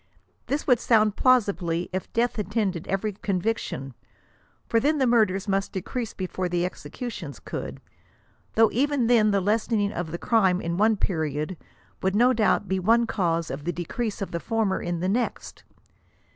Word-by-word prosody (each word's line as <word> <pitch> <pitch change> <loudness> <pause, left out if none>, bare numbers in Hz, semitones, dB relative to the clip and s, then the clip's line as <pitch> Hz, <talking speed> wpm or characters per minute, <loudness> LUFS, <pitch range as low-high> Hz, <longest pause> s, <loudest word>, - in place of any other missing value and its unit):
This 285 +3 -1
would 250 -4 +4
sound 215 -3 +3
plausibly 200 -9 +2
if 185 - -4
death 235 0 0
attended 200 -4 -1
every 200 +2 -1
conviction, 190 - -2 0.7
for 230 - +3
then 300 +6 +2
the 265 - +2
murders 215 -5 +2
must 195 0 -1
decrease 225 +5 -4
before 185 -1 -3
the 175 0 0
executions 180 - -6
could; - - -6 0.8
though 225 -1 +5
even 280 0 +1
then 225 -3 +4
the 200 -1 +2
lessening 210 +1 +1
of 175 -3 -3
the 170 - -4
latter 190 -6 +3
in 170 -1 -2
one 215 +2 +3
period, 155 -2 -1 0.5
would 190 +1 0
no 245 +4 +5
doubt 215 -3 +2
be 190 +1 0
one 230 +5 +3
cause 170 -7 -1
of 140 +2 -5
the 175 - -1
decrease 200 +5 -3
of - - -7
the 170 - -2
former 220 -1 0
in 175 -1 -3
the 185 - 0
next. 235 +5 -2
200 Hz, 165 wpm, -25 LUFS, 180-230 Hz, 0.8 s, though